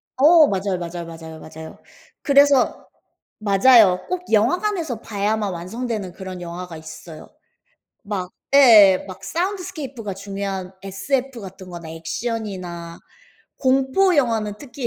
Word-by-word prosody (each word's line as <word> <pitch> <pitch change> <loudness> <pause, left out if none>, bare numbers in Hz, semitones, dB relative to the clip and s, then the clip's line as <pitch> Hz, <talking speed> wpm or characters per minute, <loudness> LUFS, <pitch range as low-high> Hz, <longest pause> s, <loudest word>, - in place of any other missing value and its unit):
어. 310 +3 +6
맞아요, 195 -1 -1
맞아요, 170 0 -6
맞아요, 160 -1 -10
맞아요. 160 0 -11 0.4
그래서 280 -2 +3 0.5
맞아요. 200 -2 +5
꼭 365 0 -2
영화관에서 310 - +1
봐야만 205 -1 -2
완성되는 200 +1 -5
그런 185 -2 -8
영화가 175 -1 -7
있어요. 160 0 -11 0.7
막 195 -4 -4 0.2
예 215 -9 +7
막 185 - -10
사운드스케이프가 330 - -4
중요한 195 -1 -5
SF 245 +6 -3
같은 190 -1 -10
거나 170 -2 -9
액션이나 175 -1 -5 0.6
공포 270 +8 +2
영화는 225 -6 +1
특히 260 -2 -6
205 Hz, 285 characters per minute, -21 LUFS, 180-260 Hz, 0.7 s, 예